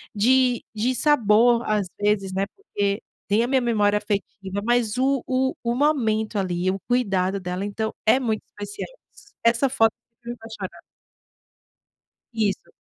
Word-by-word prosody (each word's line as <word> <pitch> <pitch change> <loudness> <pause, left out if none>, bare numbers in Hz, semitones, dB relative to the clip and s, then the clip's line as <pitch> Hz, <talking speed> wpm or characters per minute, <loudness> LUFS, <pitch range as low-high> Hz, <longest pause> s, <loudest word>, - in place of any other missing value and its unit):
de 250 +3 +3
de 240 +4 0
sabor, 240 -4 +4
às 210 -3 +1
vezes, 205 -2 +1
né, 195 +1 0
porque 205 - -2 0.3
tem 210 +3 +3
a - - 0
minha 265 -1 +2
memória 210 -3 +2
afetiva, 200 -1 -3
mas 240 -1 +1
o 270 0 +2
o 260 0 +1
o 235 0 -1
momento, 225 -7 +1
ali, 180 0 0
o 195 - -4
cuidado 195 -6 +1
dela, 180 +2 -3
então, 220 +2 -3
é 220 - +6
muito 220 -4 -1
especial. 205 - -7 0.5
Essa 235 +3 +3
foto 225 -4 +3 0.3
me 240 0 -4
faz 225 0 -10
choras. - - -7 1.5
Isso. 210 -4 -1
220 Hz, 145 wpm, -24 LUFS, 200-245 Hz, 1.5 s, é